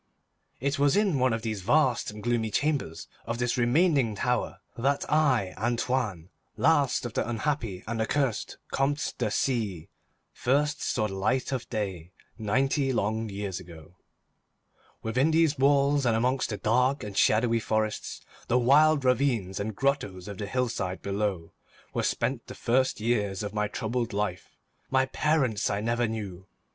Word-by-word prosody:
It 140 Hz, +3 st, -1 dB
was 145 Hz, +5 st, +4 dB
in 195 Hz, -9 st, +2 dB
one 130 Hz, 0 st, +3 dB
of 115 Hz, -1 st, -2 dB
the 110 Hz, -2 st, -1 dB
vast 120 Hz, +6 st, +2 dB
and 105 Hz, 0 st, -9 dB
gloomy 120 Hz, -2 st, 0 dB
chambers 140 Hz, -, -1 dB, 0.2 s
of 115 Hz, 0 st, -2 dB
this 125 Hz, 0 st, 0 dB
remaining 125 Hz, -, +2 dB
tower 125 Hz, +4 st, -1 dB, 0.2 s
that 140 Hz, +4 st, 0 dB
I, 130 Hz, -12 st, +2 dB
Antoine, 115 Hz, -6 st, -1 dB, 0.3 s
last 145 Hz, -6 st, +2 dB
of 120 Hz, -, -5 dB
the -, -, -1 dB
unhappy 115 Hz, -5 st, -2 dB
and 115 Hz, 0 st, -2 dB
accursed 130 Hz, 0 st, -1 dB, 0.2 s
Comtes 145 Hz, +2 st, 0 dB
de 115 Hz, -4 st, -1 dB
C——, 105 Hz, -, -1 dB, 0.4 s
first 145 Hz, +4 st, +1 dB
saw 110 Hz, -, 0 dB
the 95 Hz, -, -7 dB
light 110 Hz, +8 st, 0 dB
of 130 Hz, -3 st, -3 dB
day, 95 Hz, -6 st, -4 dB, 0.2 s
ninety 135 Hz, +5 st, +1 dB
long 110 Hz, -1 st, -1 dB
years 100 Hz, -2 st, -4 dB
ago. 85 Hz, -1 st, -13 dB, 1.1 s
Within 130 Hz, +7 st, +2 dB
these 160 Hz, -3 st, +2 dB
walls, 140 Hz, +1 st, +3 dB
and 115 Hz, -, +3 dB
amongst 125 Hz, +3 st, +1 dB
the 105 Hz, -, -3 dB
dark 125 Hz, +7 st, +1 dB
and 105 Hz, -2 st, -7 dB
shadowy 115 Hz, +3 st, +3 dB
forests, 110 Hz, -1 st, -2 dB, 0.3 s
the 120 Hz, -, +3 dB
wild 140 Hz, +3 st, +4 dB
ravines 125 Hz, -8 st, +1 dB
and 105 Hz, +1 st, -3 dB
grottoes 105 Hz, -10 st, -1 dB
of 100 Hz, -2 st, -7 dB
the 105 Hz, -, -3 dB
hillside 115 Hz, -6 st, -2 dB
below, 100 Hz, -4 st, -2 dB, 0.4 s
were -, -, 0 dB
spent -, -, -1 dB
the -, -, -8 dB
first 130 Hz, +1 st, +1 dB
years 105 Hz, -3 st, 0 dB
of 105 Hz, 0 st, -4 dB
my 105 Hz, -1 st, 0 dB
troubled 115 Hz, +1 st, -2 dB
life. 100 Hz, -3 st, -3 dB, 0.3 s
My 130 Hz, 0 st, +3 dB
parents 130 Hz, -6 st, +1 dB
I 100 Hz, -, -1 dB
never 115 Hz, +2 st, 0 dB
knew. 100 Hz, -4 st, -6 dB
115 Hz, 155 wpm, -28 LUFS, 105-135 Hz, 1.1 s, was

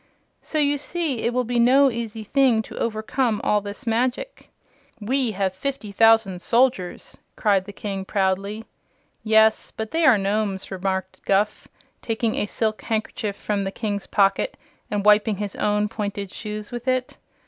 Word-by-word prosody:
So 310 Hz, -, -4 dB
you 290 Hz, -1 st, +2 dB
see 310 Hz, -4 st, -2 dB
it 235 Hz, -, 0 dB
will 250 Hz, +1 st, 0 dB
be 240 Hz, 0 st, -1 dB
no 265 Hz, +3 st, +5 dB
easy 225 Hz, -2 st, -5 dB
thing 250 Hz, -2 st, +3 dB
to -, -, -9 dB
overcome 225 Hz, +1 st, 0 dB
all 210 Hz, 0 st, +2 dB
this 205 Hz, +2 st, -8 dB
magic." 250 Hz, -, -2 dB, 0.5 s
"We 250 Hz, +4 st, 0 dB
have 190 Hz, -1 st, -1 dB
fifty 220 Hz, +1 st, -4 dB
thousand 225 Hz, -3 st, +4 dB
soldiers!" 235 Hz, -7 st, 0 dB, 0.2 s
cried 200 Hz, -3 st, +2 dB
the 205 Hz, -, -8 dB
King 195 Hz, -1 st, -5 dB
proudly. 200 Hz, +2 st, -1 dB, 0.6 s
"Yes; 220 Hz, 0 st, +4 dB
but 220 Hz, 0 st, -6 dB
they 330 Hz, +1 st, +1 dB
are 260 Hz, -8 st, +6 dB
Nomes," 200 Hz, -1 st, -1 dB
remarked 190 Hz, 0 st, -3 dB
Guph, 205 Hz, +2 st, 0 dB, 0.3 s
taking 225 Hz, 0 st, -1 dB
a 205 Hz, -, -1 dB
silk 215 Hz, +1 st, -1 dB
handkerchief 215 Hz, -2 st, -3 dB
from 205 Hz, -1 st, -2 dB
the 195 Hz, -, -3 dB
King's 205 Hz, -1 st, -3 dB
pocket 200 Hz, -, +1 dB, 0.3 s
and 205 Hz, -1 st, -2 dB
wiping 210 Hz, 0 st, +5 dB
his 205 Hz, -1 st, -4 dB
own 210 Hz, 0 st, +1 dB
pointed 205 Hz, -3 st, -4 dB
shoes 210 Hz, -1 st, -6 dB
with 240 Hz, +1 st, -6 dB
it. 255 Hz, -1 st, -1 dB
215 Hz, 160 wpm, -23 LUFS, 200-240 Hz, 0.6 s, are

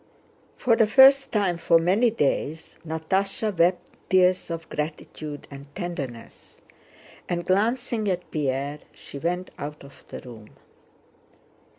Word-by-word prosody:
For 235 Hz, -3 st, +3 dB
the 225 Hz, -2 st, +4 dB
first 270 Hz, +4 st, +6 dB
time 190 Hz, -5 st, +1 dB
for 170 Hz, 0 st, +4 dB
many 190 Hz, +9 st, +3 dB
days 160 Hz, -5 st, -2 dB
Natásha 190 Hz, +6 st, -1 dB
wept 175 Hz, +2 st, +2 dB, 0.2 s
tears 185 Hz, -1 st, +3 dB
of 165 Hz, -1 st, -5 dB
gratitude 150 Hz, -1 st, -6 dB
and 140 Hz, +1 st, -10 dB
tenderness, 140 Hz, -, -7 dB, 0.7 s
and 175 Hz, -1 st, -2 dB
glancing 220 Hz, +2 st, +1 dB
at 180 Hz, -1 st, -3 dB
Pierre 140 Hz, 0 st, -2 dB, 0.2 s
she 140 Hz, -, -9 dB
went 180 Hz, +4 st, -2 dB
out 150 Hz, +1 st, -6 dB
of 140 Hz, 0 st, -15 dB
the -, -, -8 dB
room. 110 Hz, -4 st, -13 dB
175 Hz, 120 wpm, -25 LUFS, 150-200 Hz, 0.7 s, first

